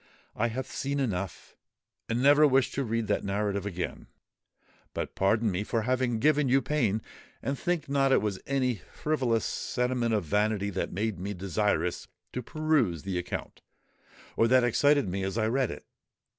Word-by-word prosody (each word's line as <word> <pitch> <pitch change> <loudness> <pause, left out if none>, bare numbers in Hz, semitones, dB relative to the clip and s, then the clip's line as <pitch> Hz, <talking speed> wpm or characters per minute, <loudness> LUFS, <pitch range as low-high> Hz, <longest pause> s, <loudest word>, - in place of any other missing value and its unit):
"I 120 - +1
have 125 +3 -3
seen 140 +1 -3
enough—and 115 +2 -5
never 145 +2 +7
wish 135 -2 +3
to 140 - -1
read 115 -1 -1
that - - 0
narrative 100 0 -1
again. 90 -2 -5 0.9
But - - -3
pardon 110 +3 +2
me 95 +3 -1
for 115 +1 -1
having 125 0 +1
given 150 +2 +3
you 135 +2 +5
pain; 120 -7 0 0.4
and 135 +4 -1
think 165 +1 -1
not 135 -1 +2
it - - +5
was 105 -3 -2
any 130 - 0
frivolous 130 -7 0
sentiment 125 -2 0
of 105 - 0
vanity 105 +3 0
that 95 - -2
made 105 0 -2
me 100 +2 -4
desirous 90 -2 -1 0.3
to 125 - -2
peruse 135 - 0
the 95 -2 -2
account, 90 - -6 0.7
or 115 - +4
that 130 +1 +5
excited 145 +2 +3
me 95 +2 -2
as 95 +3 -2
I 110 - +2
read 130 +3 +1
it. 75 - -8
115 Hz, 165 wpm, -29 LUFS, 100-135 Hz, 0.9 s, never